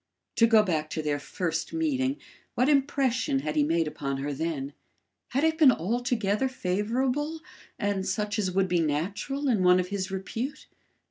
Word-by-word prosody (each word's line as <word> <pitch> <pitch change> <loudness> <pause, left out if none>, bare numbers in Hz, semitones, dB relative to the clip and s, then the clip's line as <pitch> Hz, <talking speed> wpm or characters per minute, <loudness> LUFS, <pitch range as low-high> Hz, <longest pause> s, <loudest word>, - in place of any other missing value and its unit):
To 230 - +6
go 220 -2 +6
back 155 -6 -1
to 155 - -3
their 145 -1 0
first 165 +2 -3
meeting, 285 -4 0 0.4
what 250 - +2
impression 265 - +1
had 150 +1 -3
he 150 - +3
made 165 +2 +1
upon 140 -2 -3
her 145 +2 -3
then? 145 -2 -3 0.5
Had 275 +4 -1
it 320 0 +2
been 290 -5 +8
altogether 230 - 0
favourable 255 - -1 0.4
and 205 -3 -1
such 210 +2 -1
as 195 -3 +1
would 190 +1 +1
be 180 -1 +1
natural 195 - -1
in 225 -7 +2
one 180 0 +5
of 180 0 -2
his 195 -1 -3
repute? 225 +9 -4
200 Hz, 170 wpm, -27 LUFS, 165-260 Hz, 0.5 s, been